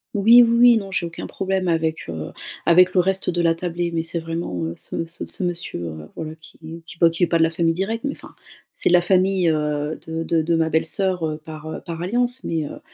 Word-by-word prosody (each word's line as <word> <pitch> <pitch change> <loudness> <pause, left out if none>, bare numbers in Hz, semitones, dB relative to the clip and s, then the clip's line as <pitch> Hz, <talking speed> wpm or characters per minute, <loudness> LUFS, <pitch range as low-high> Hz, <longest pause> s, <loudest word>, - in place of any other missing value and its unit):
Oui, 230 +4 +7
oui, 235 0 +2
oui, 240 -1 +7
non, 195 -3 -5
j'ai 175 -2 -1
aucun 165 - -8
problème 190 -1 -2
avec, 160 -1 -1
heu, 80 -2 -6 0.4
avec 180 +2 +6
le 185 - +3
reste 190 0 +1
de 175 - -1
la 165 -1 +2
tablée, 175 0 -3
mais 165 -1 -1
c'est 170 +1 -3
vraiment, 165 - -4
heu, 80 +1 -4
ce 165 - -4
ce 165 - -5
ce - - -2
monsieur, 175 - -3
heu, 80 -1 -9
voilà 155 -1 -6
qui 160 +1 -12
qui 170 0 -12
bah, 170 - +6
qui 165 +2 -2
est - - +4
pas 170 - +1
de 165 - +5
la 165 - +3
famille 165 0 +1
directe, 210 +6 -3
mais 280 - -1
enfin, - - -12 0.4
c'est - - +1
la 175 0 +6
famille, 185 -1 +2
heu, 150 0 -1
de 160 0 -4
de 165 -1 +1
de 170 +1 +1
ma 160 0 +1
belle-soeur 160 0 0
par, 155 -1 -9
heu, 155 - -6
par 165 -1 -6
alliance, 245 +7 -1
mais 160 -2 -2
heu, - - -9
170 Hz, 240 wpm, -22 LUFS, 160-185 Hz, 0.4 s, Oui